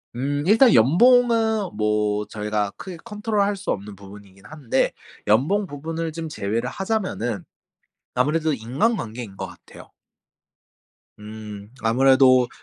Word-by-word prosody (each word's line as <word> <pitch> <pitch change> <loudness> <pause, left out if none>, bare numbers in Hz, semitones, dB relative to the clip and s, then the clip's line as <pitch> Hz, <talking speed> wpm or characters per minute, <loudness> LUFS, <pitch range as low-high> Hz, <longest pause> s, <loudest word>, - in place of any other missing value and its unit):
음 145 +3 -2
일단 225 +3 +6
연봉은 220 - +4
뭐 105 -1 0
저희가 105 -1 -2
크게 185 -3 -8
control 210 -1 -1
할 205 0 -1
수 200 +1 -8
없는 100 0 -5
부분이긴 100 0 -14
한데 150 -6 -1 0.4
연봉 160 - +2
부분을 160 +3 -5
좀 165 0 -6
제외를 115 -1 -2
하자면은 185 - -3 0.7
아무래도 155 +5 +1
인간관계인 120 - -2
거 95 -1 -5
같아요. 90 -1 -15 1.3
음 105 -1 -9
아무래도 130 +1 +4
130 Hz, 285 characters per minute, -23 LUFS, -, 1.3 s, 일단